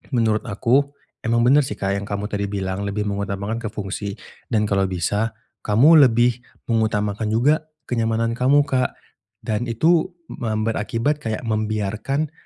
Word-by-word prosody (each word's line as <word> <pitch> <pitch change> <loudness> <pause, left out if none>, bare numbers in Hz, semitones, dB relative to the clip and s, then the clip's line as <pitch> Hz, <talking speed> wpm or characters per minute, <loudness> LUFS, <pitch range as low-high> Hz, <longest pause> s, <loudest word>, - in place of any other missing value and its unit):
menurut 110 -2 +2
aku 135 +7 +1 0.2
emang 115 +1 +1
bener 135 +4 +6
sih 105 - -4
Kak, 100 -1 -2
yang 100 - -7
kamu 105 +1 -4
tadi 100 -1 -1
bilang 100 0 -3
lebih 105 +1 -2
mengutamakan 100 +2 -3
ke 115 - -4
fungsi, 100 -1 -5 0.3
dan 105 -2 +1
kalau 100 -2 +1
bisa 100 +5 -1 0.2
kamu 140 +7 +6
lebih 120 +1 +2 0.3
mengutamakan 110 -1 0
juga 145 +8 +2 0.2
kenyamanan 115 -2 0
kamu 135 +4 +3
Kak, 130 -3 0 0.5
dan 110 +3 -2
itu 160 +10 +3 0.2
mem 110 -3 -2
berakibat 115 +6 -1
kayak 110 -4 -4
membiarkan 110 +6 -1
110 Hz, 145 wpm, -22 LUFS, 105-125 Hz, 0.5 s, bener